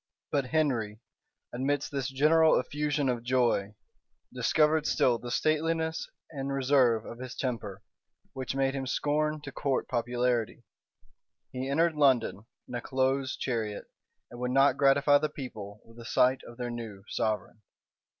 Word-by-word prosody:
But 140 -2 +1
Henry, 125 -8 0 0.5
amidst 135 +3 -1
this 140 -1 -2
general 155 +4 +4
effusion 145 +1 -1
of 125 -2 0
joy, 120 -5 +1 0.6
discovered 155 0 +2
still 120 -2 +2
the 120 - -7
stateliness 160 +4 0 0.2
and 140 -2 -4
reserve 130 -4 +3
of 115 - -9
his 130 0 -7
temper, 115 -7 -4 0.5
which 130 0 -4
made 135 0 +1
him 135 -1 -3
scorn 150 +3 0
to 140 -2 -8
court 140 -1 -1
popularity: 120 -1 -1 0.9
he 130 +1 -4
entered 165 +4 +2
London 130 -7 +2 0.2
in - - -10
a 120 - -3
close 130 +1 0
chariot, 110 -5 -3 0.4
and 120 - -10
would 125 0 -1
not 135 +2 +4
gratify 140 +1 +4
the 155 - -1
people 110 -8 -8
with 115 +1 -16
a 115 - -10
sight 125 +2 +3
of 120 - -12
their 120 -1 -4
new 110 -5 -7
sovereign. 110 0 -2
130 Hz, 145 wpm, -29 LUFS, 120-145 Hz, 0.9 s, general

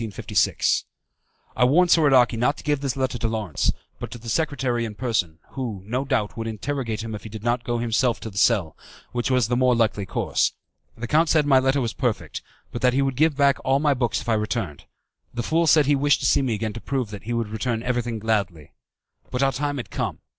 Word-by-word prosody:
I 125 - +2
warned 170 +8 +4
Soradaci 135 -7 +5
not 125 +6 +1
to - - -11
give 145 -2 0
this 135 -2 -2
letter 130 -2 -1
to 115 - 0
Lawrence, 110 -8 -1 0.3
but - - -5
to - - -8
the 115 0 -9
secretary 130 -4 0
in 110 -2 -5
person, 105 -9 -1
who, 115 -8 -5
no 125 +6 -2
doubt, 105 -6 -1
would 115 0 -4
interrogate 115 -1 -3
him 115 -1 -5
if 105 - -6
he 110 - -9
did 110 0 -8
not 120 +1 0
go 120 0 -1
himself 120 +1 +1
to 110 - -6
the 100 - -11
cell, 95 -11 +2 0.4
which 120 +1 -1
was 125 -4 +2
the 120 - 0
more 125 0 +3
likely 110 -4 0
course. - - 0 0.4
The 115 - -4
count 155 +7 +2
said 155 -2 +3
my 135 -2 +5
letter 135 +1 +1
was 115 -3 -2
perfect, - - -2 0.3
but 120 - -5
that 125 -1 +3
he 135 +1 +2
would 135 -1 -1
give 155 +3 +3
me 140 0 0
back 140 -1 +4
all 135 +1 +3
my 145 0 +2
books 125 -3 -1
if 120 - -12
I 115 - +2
returned. 105 - -2 0.5
The 120 - -2
fool 165 +6 +1
said 155 -2 +5
he 145 +1 +3
wished 145 +1 +2
to - - -1
see - - +4
me 125 -5 0
again 110 0 -3
to 115 - -8
prove 130 -6 -2
that 105 -1 -9
he 120 - -2
would 115 -2 -1
return 115 +1 -2
everything 120 -2 -1
gladly. 100 -8 -2 0.6
But 125 +2 -1
our 135 - +3
time 145 +1 -2
was 125 - -4
come. - - -3
120 Hz, 235 wpm, -24 LUFS, 110-135 Hz, 0.6 s, Soradaci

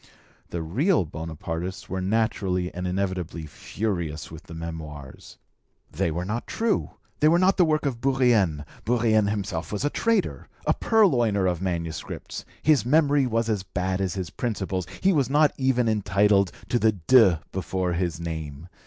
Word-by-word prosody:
The 85 -1 -3
real 130 - +2
Bonapartists 80 +4 -5
were 95 0 -3
naturally 95 -3 0
and 90 +1 -4
inevitably 90 -3 -2
furious 80 - -4
with 80 0 -9
the 80 - -10
Memoirs. 75 -4 -8 0.5
They - - 0
were 85 +3 -3
not 110 +5 -3
true, 225 -1 0 0.3
they 150 - +5
were 165 +2 +5
not 185 +2 +4
the 180 - +5
work 155 -1 +1
of 125 -4 -2
Bourrienne, 120 - +2 0.2
Bourrienne 110 -2 +2
himself 95 -6 -3
was 105 +6 -2
a 145 - +1
traitor, 230 -1 0 0.2
a - - +3
purloiner 120 - +3
of 90 -2 0
manuscripts, 85 -4 -4 0.2
his 150 -6 +4
memory 145 +1 +3
was 115 -1 0
as 105 -4 0
bad 95 0 -2
as 95 -3 -1
his 90 -5 -4
principles, 95 -5 -3
he 195 0 +4
was 140 -6 +1
not 150 +1 +4
even 130 -3 +1
entitled 100 -2 +3 0.2
to 120 - +2
the 110 -1 +3
de 95 -2 +5
before 95 -1 -2
his 85 -2 -1
name. 80 -1 -6
95 Hz, 160 wpm, -25 LUFS, 85-120 Hz, 0.5 s, they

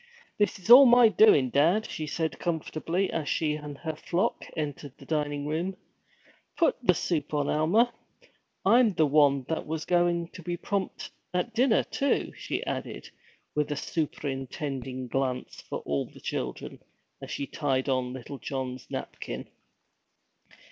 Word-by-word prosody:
'This 205 -2 +2
is 190 +3 -11
all 265 +2 +11
my 240 -1 +7
doin', 200 - +5
dad,' 170 +10 +3
said 160 +1 -3
she - - -15
comfortably, 170 +2 -1
as 155 -3 -2
she 155 -2 +1
and 150 -2 -7
her 160 0 -4
flock 175 +4 -1
entered 145 -3 -5
the 135 - -14
dining 145 -1 -1
room. 165 +6 -2 0.8
'Put 335 - +3
the 180 -8 +4
soup 155 -4 -1
on, 145 -1 +1
Alma. 210 +11 +3 0.7
I'm 230 +1 +5
the 160 - +3
one 140 -2 +4
that 160 - -3
was 160 0 -3
goin' 175 -1 +2
to 180 - -11
be 175 +1 -3
prompt 195 +1 -3 0.2
at 220 +6 -1
dinner, 235 0 +3
too!' 280 - -1
she - - -4
added, - - -5 0.4
with 150 0 0
a - - 0
superintending 135 -4 -4
glance 130 0 -2
for - - -6
all 70 -1 -2
the - - -15
children, - - -5 0.4
as - - -8
she 140 - -3
tied 135 -2 -1
on 130 -2 0
little 130 +2 -8
John's 130 -2 -5
napkin. - - -6
155 Hz, 150 wpm, -28 LUFS, 140-180 Hz, 0.8 s, all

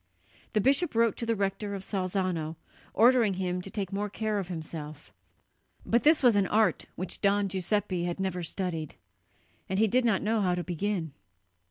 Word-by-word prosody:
The 215 - +3
bishop 280 - +2
wrote 230 -1 +3
to 235 - -4
the 230 - +2
rector 200 0 -2
of 195 - -6
Salzano, 185 -5 -2 0.4
ordering 230 -2 +5
him 180 -1 -2
to 195 - -8
take 195 -1 -4
more 205 +1 -2
care 215 0 -2
of 190 - -4
himself; 155 -3 -7 0.7
but 235 - +2
this 310 -1 +5
was 240 -4 +6
an 200 -2 +3
art 210 -4 +2
which 185 0 -5
Don 200 0 +3
Giuseppe 190 -1 -1
had 175 +1 -3
never 190 -2 -2
studied, 165 -3 -3 0.7
and 190 - -1
he 220 +2 +4
did 250 +5 +2
not 225 -5 +2
know 220 +1 +1
how 180 -2 +2
to 175 - -3
begin. 175 -3 -2
195 Hz, 180 wpm, -29 LUFS, 180-215 Hz, 0.7 s, was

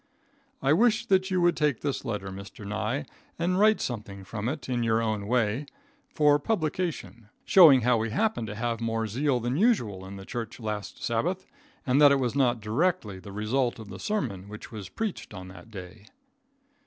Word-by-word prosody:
I 135 +2 +4
wish 220 +4 +3
that 190 0 +2
you 185 -1 +1
would 175 0 +4
take 150 -6 +1
this 145 -2 -2
letter, 105 -4 -4
Mr. 100 +2 -9
Nye, 110 +6 -2 0.3
and 180 +2 0
write 215 +1 +5
something 105 -5 -5
from 105 +4 -4
it 145 -1 -5
in 125 -2 -1
your 115 -1 +2
own 110 -3 -1
way, 120 +3 +1 0.5
for 150 -1 +5
publication, 155 - -2 0.2
showing 155 -9 +8
how 120 +1 +3
we 110 +1 -1
happened 210 - 0
to 105 - -6
have 115 +1 -2
more 115 -1 -1
zeal 125 +4 0
than 120 +3 -1
usual 140 - +2
in 100 - -8
the 95 0 -9
church 120 0 -5
last 105 -3 -5
Sabbath, 170 +12 -1 0.4
and 130 +3 +3
that 145 -1 +8
it 140 - +4
was 125 -3 0
not 125 -4 +2
directly 110 - 0
the 100 +2 -10
result 120 +5 0
of 110 -3 -10
the 95 - -8
sermon 105 - -3
which 105 +2 -9
was 105 -4 -7
preached 215 - -4
on 95 0 -8
that 95 +3 -13
day. 100 +1 -10
120 Hz, 190 wpm, -27 LUFS, 105-150 Hz, 0.5 s, showing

